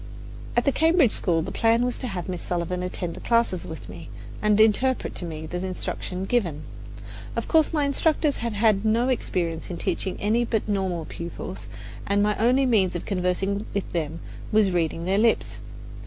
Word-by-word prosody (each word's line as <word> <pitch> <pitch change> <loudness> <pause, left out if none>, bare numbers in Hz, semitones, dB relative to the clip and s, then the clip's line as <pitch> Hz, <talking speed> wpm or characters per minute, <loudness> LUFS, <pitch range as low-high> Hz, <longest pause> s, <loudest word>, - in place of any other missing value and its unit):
At 240 - +3
the 280 - +4
Cambridge 320 - +4
School 165 -3 +2
the 190 - -5
plan 230 +3 +3
was 250 - -2
to 255 - -3
have 185 -6 -4
Miss 180 -2 -4
Sullivan 180 +1 -2
attend 180 -1 -3
the - - -9
classes 230 -7 +1
with 160 -10 -8
me 85 -2 -10 0.3
and 210 0 +3
interpret 225 +4 +3
to 175 - -4
me 160 -2 -6
the 180 +3 -4
instruction 185 0 -4
given. 175 -10 0 0.7
Of - - -2
course 320 -2 +4
my 300 -2 +1
instructors 295 +1 +1
had 235 -1 -3
had 210 -1 +3
no 230 +3 +2
experience 170 -9 -2
in 175 - -4
teaching 185 +1 -1
any 220 +4 +2
but 225 -3 -1
normal 190 -5 -1
pupils, 170 +2 -7 0.4
and 200 0 +2
my 210 0 +2
only 250 +4 +4
means 205 -8 +2
of 175 - -4
conversing 195 +1 -1
with 200 - -2
them 165 -1 -2 0.3
was 215 -3 +4
reading 165 -1 -1
their 195 +2 +2
lips. 230 0 +1
200 Hz, 185 wpm, -25 LUFS, 175-235 Hz, 0.7 s, the